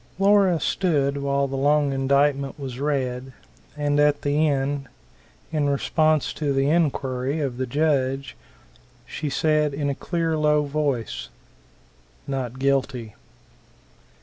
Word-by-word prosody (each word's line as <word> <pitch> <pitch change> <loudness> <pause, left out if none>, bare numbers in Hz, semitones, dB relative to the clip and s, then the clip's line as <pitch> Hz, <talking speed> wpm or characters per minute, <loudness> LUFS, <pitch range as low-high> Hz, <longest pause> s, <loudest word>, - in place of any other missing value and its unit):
Laura 195 -3 +4
stood 145 -8 0
while 140 0 0
the 135 - -5
long 145 +1 +2
indictment 140 +1 +1
was 130 -3 -6
read; 130 -3 -2 0.4
and 145 0 +1
at 145 0 +3
the 145 +2 +2
end, 140 0 -1 0.6
in 150 -3 +1
response 155 +2 +1
to 150 -2 -2
the 135 0 +1
inquiry, 140 -3 0
of 135 -5 -2
the 130 0 -2
judge, 140 -1 0 0.7
she 150 - -4
said 150 0 +1
in 145 -1 -1
a - - -1
clear, 165 +2 -2
low 150 -1 +2
voice; 140 - -2 1.0
"Not 130 -3 -4
guilty." 130 -4 -1
140 Hz, 120 wpm, -24 LUFS, 135-150 Hz, 1.0 s, Laura